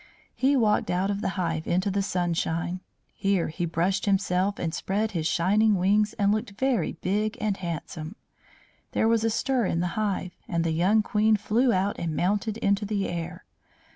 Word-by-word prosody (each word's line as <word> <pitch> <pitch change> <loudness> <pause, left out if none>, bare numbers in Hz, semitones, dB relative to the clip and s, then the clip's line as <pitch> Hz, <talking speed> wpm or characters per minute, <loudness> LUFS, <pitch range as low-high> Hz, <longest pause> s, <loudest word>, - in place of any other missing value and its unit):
He 275 +2 +2
walked 215 -4 +2
out 185 +3 +1
of 200 0 -3
the 215 - 0
hive 165 -3 -2
into 185 +3 +1
the 200 +1 0
sunshine. 175 -2 -1 0.3
Here 195 -3 0
he 165 +2 -3
brushed 180 +5 0
himself 195 0 +1
and 165 -2 -3
spread 210 +5 -1
his 165 -5 -1
shining 205 +6 +3
wings 205 +3 +2
and 200 -2 +2
looked 215 -1 -2
very 260 -9 +1
big 210 +4 -1
and 210 -2 0
handsome. 170 -1 -6 0.8
There 220 - +2
was 225 -1 +2
a 225 - +2
stir 245 0 0
in 165 - 0
the 175 0 0
hive, 195 -4 -2
and 170 -1 0
the 165 - 0
young 190 +7 +3
Queen 215 +1 +3
flew 230 +5 +2
out 195 +1 0
and 165 -2 -2
mounted 205 +5 0
into 200 -1 +1
the 205 -1 -1
air. 175 +1 -5
195 Hz, 180 wpm, -26 LUFS, 175-215 Hz, 0.8 s, shining